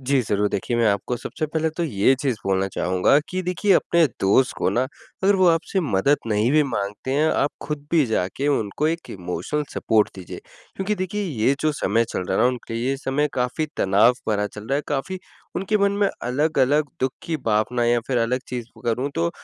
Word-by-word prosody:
जी, 135 0 +2
ज़रूर 105 -1 0
देखिए 110 +5 -2
मैं 115 -1 +3
आपको 100 +5 -1
सबसे 155 +6 -4
पहले 160 +1 -1
तो 170 +2 -4
ये 115 -1 +3
चीज़ 130 -5 0
बोलना 95 0 +1
चाहूँगा 90 +9 +2
कि 185 0 -2
देखिए 180 +3 +1
अपने 170 -2 +4
दोस्त 115 +7 +3
को - - +1
ना, 125 - +1 0.4
अगर 200 +1 +5
वो 185 -1 +4
आपसे 165 +3 +1
मदद 140 - +2
नहीं 110 +2 +1
भी 155 0 +5
माँगते 105 -1 -3
हैं 150 +3 +3
आप 145 - +1
खुद 145 -1 -5
भी 165 -3 +4
जाके 110 +6 -1
उनको 140 +2 0
एक 165 +1 -4
इमोशनल 90 - -3
सपोर्ट 110 -2 +2
दीजिए, 95 -3 -8 0.4
क्योंकि 195 +2 -1
देखिए 195 +2 -3
ये 135 - +1
जो 155 - +2
समय 115 -3 +1
चल 110 - -4
रहा - - -2
है - - +3
ना 125 - +5
उनके 120 -2 -5
लिए 120 +2 -1
ये 135 - -1
समय 145 +2 0
काफ़ी 125 +5 -1
तनाव 100 +5 +4 0.2
भरा 105 -1 +1
चल 105 +1 -10
रहा 135 - 0
है 150 - -1
काफ़ी 150 +7 -2 0.4
उनके 195 +3 0
मन 200 0 +3
में 200 - +4
अलग-अलग 145 +2 +2
दुख 130 0 +1
की 165 -1 -2
भावना 115 +3 +1
या 120 0 +3
फिर 125 -2 +1
अलग 125 +3 0
चीज़ 120 -2 -4 0.2
करूँ 125 +5 0
तो 85 0 0
130 Hz, 210 wpm, -23 LUFS, 110-155 Hz, 0.4 s, अगर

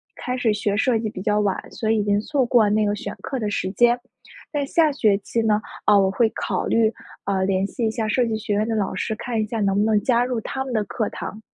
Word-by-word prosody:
开 250 +1 -4
始 225 -4 +2
学 205 -1 -1
设 235 -2 +2
计 220 -1 -2
比 185 - -8
较 210 0 +2
晚， 200 -2 +1
所 220 - -3
以 225 - +3
已 210 - +1
经 205 0 +1
错 275 0 0
过 235 -3 +4
那 215 +1 +2
个 205 0 0
选 200 0 -6
课 265 - -3
的 210 -2 -1
时 190 -2 -2
间， 240 +2 +3 0.5
但 290 -2 -1
下 315 -1 +3
学 215 -7 +2
期 230 +3 -2
呢， 215 -1 +2 0.3
啊， 210 - +6
我 190 -1 +3
会 225 +2 +2
考 - - -2
虑， 225 -1 +2 0.3
呃， 195 -1 0
联 190 0 +1
系 225 +2 -2
一 - - +1
下 220 -1 -2
设 245 +4 +2
计 220 -1 -1
学 210 -1 -3
院 210 +2 +1
的 225 - -1
老 205 -3 -1
师， 215 +4 -2
看 235 -1 -2
一 - - 0
下 225 +1 -3
能 195 -1 +1
不 205 - +3
能 215 -1 +3
加 240 -1 +3
入 245 -2 -1
他 265 +4 -3
们 265 - -6
的 220 -3 +1
课 215 +1 -3
堂。 215 +3 -7
220 Hz, 290 characters per minute, -23 LUFS, 205-235 Hz, 0.5 s, 啊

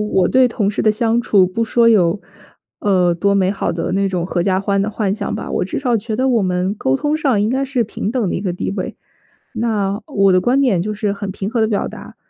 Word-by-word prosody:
我 190 -4 +1
对 255 -1 +4
同 210 -4 -1
事 210 - -2
的 215 - +4
相 225 +2 +1
处 200 -5 +3
不 205 +6 -2
说 230 +1 +3
有， 195 -3 +3 0.6
呃， 180 -4 +2
多 200 +4 +1
美 190 -1 +2
好 200 - -2
的 165 - -3
那 195 +1 +1
种 180 -3 -2
阖 175 -1 -1
家 190 0 +1
欢 200 0 0
的 210 - -2
幻 205 -2 -1
想 210 -1 -4
吧， - - -6
我 - - 0
至 185 - -4
少 250 -4 +1
觉 220 +1 -4
得 260 +2 +1
我 235 -4 +2
们 185 +1 -1
沟 130 -9 0
通 295 - 0
上 270 -9 +1
应 210 - +1
该 265 +3 0
是 260 -3 -1
平 210 0 -4
等 235 -5 -1
的 - - -2
一 - - -2
个 190 -3 -2
地 175 - -3
位。 195 -2 -5 0.6
那 215 -3 -1
我 195 -2 +2
的 185 - +4
观 250 +7 +2
点 205 -11 +2
就 215 +3 -3
是 210 -1 -1
很 200 -1 -5
平 195 +1 -4
和 235 -1 -1
地 220 - +3
表 210 -2 -1
达， - - -11
205 Hz, 280 characters per minute, -18 LUFS, 190-230 Hz, 0.6 s, 对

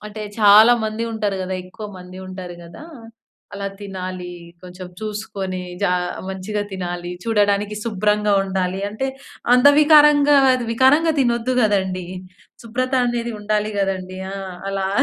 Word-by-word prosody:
అంటే 215 +1 -7 0.2
చాలా 215 +2 +7
మంది 220 +2 -3
ఉంటారు 205 -3 -2
కదా! 185 0 -4
ఎక్కువ 210 +4 -9
మంది 180 +1 -11
ఉంటారు 185 -2 -8
గదా! 170 - -12 0.7
అలా 200 0 -4
తినాలి, 185 -2 -6 0.3
కొంచెం 180 0 -9
చూసుకొని 205 -3 -5 0.2
జ - - +3 0.4
మంచిగా 190 +2 -3
తినాలి, 175 -2 -5
చూడడానికి 205 -1 +1
శుభ్రంగా 210 -1 +1
ఉండాలి. 190 0 -2
అంటే 240 +6 -3 0.4
అంద 250 +2 +5
వికారంగా, 295 -1 +6 0.4
వికారంగా 290 +7 +4
తినొద్దు 240 0 +1
కదండీ. 190 -4 0 0.6
శుభ్రత 255 +3 -3
అనేది 240 -1 -2
ఉండాలి 210 0 -1
కదండీ. 185 -1 -2
ఆ! - - -5 0.4
అలా. 195 -1 -2
205 Hz, 125 wpm, -20 LUFS, 185-230 Hz, 0.7 s, చాలా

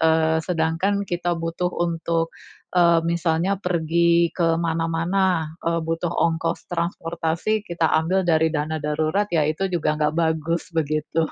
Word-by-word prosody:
eee, 160 0 +3
sedangkan 180 +4 0
kita 175 0 -1
butuh 165 +2 -2
untuk, 165 -1 -1 0.4
eee, 170 -2 +5
misalnya 170 +3 +1
pergi 170 -1 +2
ke 165 -2 +2
mana-mana, 165 0 0
eee, 170 0 +1
butuh 165 +2 -1
ongkos 165 -1 0
transportasi, 170 +3 -1
kita 170 -1 +1
ambil 185 +4 +1
dari 160 -1 +3
dana 155 0 -1
darurat, 155 +7 0
ya 160 -3 +3
itu 175 +5 -1
juga 155 -3 +1
enggak 150 0 0
bagus, 165 +1 0
begitu. 155 0 0
165 Hz, 135 wpm, -23 LUFS, 160-175 Hz, 0.4 s, eee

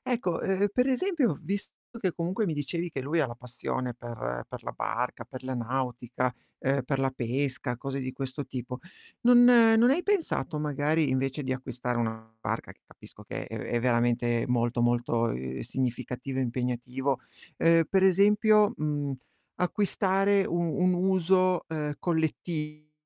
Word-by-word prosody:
Ecco, 225 -9 0
uhm, 195 +1 +2
per 250 +5 +2
esempio, 275 - +2
ho 145 - -4
visto 200 +2 -4 0.3
che 190 -5 0
comunque 180 +6 -1
mi 165 - 0
dicevi 170 +4 -3
che 140 - -4
lui 145 +6 -1
ha 150 - +2
la 120 - -7
passione 125 0 -4
per 110 - -5
per - - -8
la - - -5
barca, 120 0 -3
per 130 +1 -10
la 130 - -3
nautica, 125 0 -2 0.3
uhm, 135 0 +1
per 135 +1 -1
la 135 0 +1
pesca, 130 0 -2
cose 135 +1 -4
di 130 0 -4
questo 135 +1 -4
tipo, 125 0 -6 0.4
non 245 0 +7
non 230 -1 +7
hai 335 +6 +2
pensato, 330 - 0
magari, 150 +1 +1
invece 135 +2 -1
di 130 -1 -1
acquistare 125 -1 -4
una 110 -1 -3
barca, - - -3
che - - -31
capisco - - -15
che - - -5
è - - -7
è 120 - -1
veramente 120 -1 +2
molto, 120 -1 +1
molto, 120 -1 +1
uhm, 65 +1 -4
significativo 125 +2 -3
e - - +2
impegnativo, 125 +2 -1 0.4
uhm, 165 0 +5
per 190 -1 +3
esempio, 210 +3 +5
mhmm, 145 -2 -1 0.4
acquistare 195 +1 +2
u-un 175 +2 +1
uso, 185 0 +2
uhm, 150 -2 -2
collettivo, 155 -2 -2
140 Hz, 160 wpm, -28 LUFS, 125-185 Hz, 0.4 s, non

